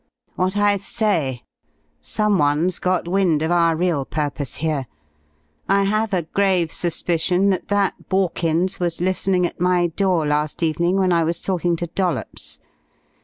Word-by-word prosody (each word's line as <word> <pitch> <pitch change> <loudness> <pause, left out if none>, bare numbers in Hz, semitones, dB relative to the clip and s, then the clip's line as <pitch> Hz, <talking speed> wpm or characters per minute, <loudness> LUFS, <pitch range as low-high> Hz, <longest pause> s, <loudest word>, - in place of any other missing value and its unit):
"What 185 +2 -1
I 205 0 +3
say. 190 - -1 0.6
Someone's 175 - +1
got 180 -1 0
wind 175 -4 +2
of 160 - 0
our 170 -1 +3
real 165 -4 0
purpose 145 -2 -3
here. 150 -4 -2 0.8
I 200 0 +4
have 215 +2 0
a 180 -3 0
grave 185 -1 +1
suspicion 180 +3 0
that 185 - -2
that 205 -1 -1
Borkins 180 -1 0
was 175 -2 -1
listening 185 0 +1
at 175 - -5
my 180 -1 +3
door 175 -1 +1
last 150 +2 -1
evening 170 +3 +1
when 185 -2 +2
I 170 -1 +3
was 170 +1 -1
talking 175 -2 0
to 175 - -3
Dollops. 175 +1 -3
175 Hz, 145 wpm, -21 LUFS, 160-190 Hz, 0.8 s, I